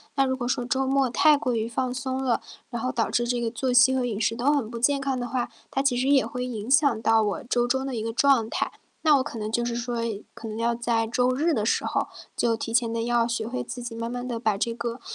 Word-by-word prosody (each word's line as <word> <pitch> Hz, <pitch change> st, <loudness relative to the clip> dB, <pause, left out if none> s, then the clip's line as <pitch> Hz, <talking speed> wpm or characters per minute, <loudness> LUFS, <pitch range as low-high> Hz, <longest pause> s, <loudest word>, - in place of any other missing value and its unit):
那 275 Hz, -1 st, +3 dB
如 260 Hz, 0 st, 0 dB
果 245 Hz, -2 st, -3 dB
说 245 Hz, 0 st, -1 dB
周 265 Hz, +2 st, 0 dB
末 270 Hz, -1 st, +2 dB
太 300 Hz, +5 st, +5 dB
过 255 Hz, -3 st, -1 dB
于 225 Hz, -1 st, -1 dB
放 250 Hz, +2 st, -2 dB
松 260 Hz, 0 st, -3 dB
了， 250 Hz, -3 st, +1 dB, 0.3 s
然 235 Hz, -3 st, -4 dB
后 255 Hz, +2 st, -1 dB
导 230 Hz, -, -1 dB
致 240 Hz, 0 st, +1 dB
这 245 Hz, 0 st, 0 dB
个 230 Hz, -1 st, -1 dB
作 255 Hz, +2 st, -1 dB
息 250 Hz, +1 st, +6 dB
和 260 Hz, -1 st, +1 dB
饮 225 Hz, -4 st, -2 dB
食 225 Hz, +1 st, +1 dB
都 250 Hz, +5 st, +2 dB
很 280 Hz, -7 st, 0 dB
不 235 Hz, -, -5 dB
健 280 Hz, +4 st, +3 dB
康 270 Hz, -2 st, -1 dB
的 245 Hz, -, -3 dB
话， 245 Hz, -1 st, -2 dB, 0.2 s
它 270 Hz, -, -1 dB
其 275 Hz, -3 st, +2 dB
实 255 Hz, +2 st, 0 dB
也 280 Hz, -1 st, +4 dB
会 250 Hz, -3 st, -4 dB
影 235 Hz, -1 st, -4 dB
响 280 Hz, -5 st, +4 dB
到 225 Hz, 0 st, +4 dB
我 205 Hz, -2 st, -1 dB
周 240 Hz, 0 st, +1 dB
中 265 Hz, +2 st, 0 dB
的 270 Hz, -, -4 dB
一 225 Hz, -, -2 dB
个 225 Hz, +1 st, -2 dB
状 245 Hz, -3 st, +3 dB
态。 -, -, -1 dB, 0.3 s
那 310 Hz, -2 st, +5 dB
我 265 Hz, -, +2 dB
可 230 Hz, -, -6 dB
能 215 Hz, 0 st, -3 dB
就 240 Hz, +2 st, 0 dB
是 235 Hz, 0 st, -2 dB
说 240 Hz, 0 st, -3 dB, 0.4 s
可 -, -, -11 dB
能 215 Hz, -, -5 dB
要 235 Hz, +1 st, +1 dB
在 230 Hz, -1 st, 0 dB
周 245 Hz, +2 st, +1 dB
日 315 Hz, +6 st, +1 dB
的 215 Hz, -5 st, 0 dB
时 -, -, +1 dB
候 -, -, -1 dB, 0.3 s
就 230 Hz, -1 st, +1 dB
提 225 Hz, -, -5 dB
前 230 Hz, -1 st, +2 dB
地 230 Hz, 0 st, -1 dB
要 240 Hz, -1 st, +2 dB
学 230 Hz, -2 st, -2 dB
会 255 Hz, +2 st, -3 dB
自 245 Hz, -, -7 dB
己 240 Hz, -1 st, -6 dB
慢 230 Hz, +1 st, -4 dB
慢 245 Hz, 0 st, -4 dB
地 240 Hz, -2 st, -3 dB
把 215 Hz, -4 st, +1 dB
这 230 Hz, +3 st, -1 dB
个 235 Hz, +1 st, -4 dB
245 Hz, 305 characters per minute, -25 LUFS, 230-260 Hz, 0.4 s, 息